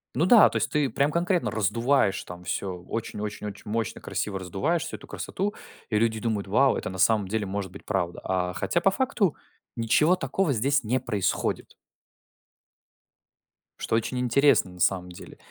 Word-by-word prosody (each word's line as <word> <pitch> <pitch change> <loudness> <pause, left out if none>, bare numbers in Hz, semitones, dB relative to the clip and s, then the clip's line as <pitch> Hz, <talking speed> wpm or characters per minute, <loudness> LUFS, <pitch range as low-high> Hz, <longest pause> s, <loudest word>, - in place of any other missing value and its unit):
Ну 150 +7 +2
да, 215 +3 +8
то - - -11
есть - - -1
ты 150 -3 +1
прям 140 +6 +1
конкретно 170 - 0
раздуваешь 110 +1 +1
там 90 0 -10
всё 95 +1 -3
очень 115 -2 -4
очень 105 0 -5
очень 100 0 -9
мощно, 115 0 -2
красиво 100 -2 -3
раздуваешь 130 - -1
всю - - -6
эту - - -15
красоту, 205 +2 -3 0.4
и 110 - +1
люди 110 -1 +1
думают: 105 -3 -2
"Вау, 130 +7 +3
это - - -3
на 95 - -7
самом 105 -1 +3
деле 105 +1 -1
может 95 -1 -4
быть - - -12
правда". 90 -4 -2
А 90 -1 -1
хотя 170 - 0
по 195 - +4
факту 215 - 0 0.4
ничего 125 +9 +3
такого 185 -4 0
здесь 135 +4 +1
не 125 +4 0
происходит. 110 -6 -1 2.1
Что - - -1
очень 115 +3 -1
интересно, 125 -4 +3
на 90 - -14
самом 90 0 +1
деле. 90 - -12
110 Hz, 175 wpm, -26 LUFS, 95-140 Hz, 2.1 s, да